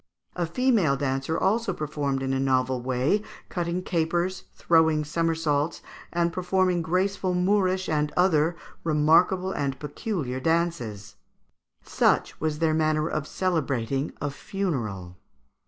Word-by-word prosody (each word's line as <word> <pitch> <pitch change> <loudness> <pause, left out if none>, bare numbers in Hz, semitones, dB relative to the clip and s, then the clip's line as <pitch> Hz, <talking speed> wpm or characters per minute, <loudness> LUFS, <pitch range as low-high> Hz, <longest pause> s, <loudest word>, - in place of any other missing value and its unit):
A 175 -2 -1
female 195 - +2
dancer 135 +3 -1
also 225 +4 +1
performed 145 -3 -2
in 135 0 -1
a 135 - 0
novel 130 -1 +1
way, 130 +10 +1 0.3
cutting 175 +1 -2
capers, 175 +2 -1
throwing 160 -2 +3
somersaults, 160 -1 0 0.3
and 170 0 0
performing 185 0 +1
graceful 185 +2 0
Moorish 185 0 +1
and 150 -1 0
other 170 -2 +3 0.3
remarkable 165 +4 +3
and 135 -5 -2
peculiar 145 - -3
dances." 130 - -1 0.7
Such - - +1
was 155 -1 -1
their 160 0 +2
manner 155 0 +1
of 155 -2 -3
celebrating 140 -6 -1
a 145 - -2
funeral. 115 - -4
160 Hz, 120 wpm, -26 LUFS, 140-180 Hz, 0.7 s, throwing